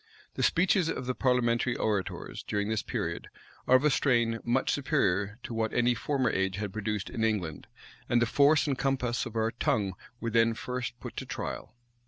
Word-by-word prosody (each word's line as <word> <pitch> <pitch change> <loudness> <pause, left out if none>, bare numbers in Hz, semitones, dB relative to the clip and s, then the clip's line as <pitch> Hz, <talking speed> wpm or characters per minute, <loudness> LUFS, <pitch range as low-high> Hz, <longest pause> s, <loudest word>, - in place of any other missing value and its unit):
The - - -4
speeches 180 0 +3
of 125 - -3
the 130 - -1
parliamentary 125 -1 +1
orators, 105 -3 -2
during 105 0 -2
this 110 -1 0
period, - - -3 0.4
are 130 - +6
of 130 - +4
a 150 - +4
strain 120 -5 +2
much 125 +3 +1
superior 105 -6 0
to - - -6
what 110 -1 -1
any 120 0 +3
former 130 +1 0
age 95 -1 0
had 100 -1 -4
produced 105 -2 -3
in 110 - -2
England; 95 -9 -1 0.4
and 120 - +4
the 120 - +3
force 145 +6 +4
and 140 -3 0
compass 125 -3 0
of 115 - -10
our 110 0 +1
tongue 100 -4 0 0.3
were 115 - -3
then 115 0 +3
first 125 0 -4
put - - -8
to - - -4
trial. - - -5
115 Hz, 190 wpm, -29 LUFS, 110-130 Hz, 0.4 s, are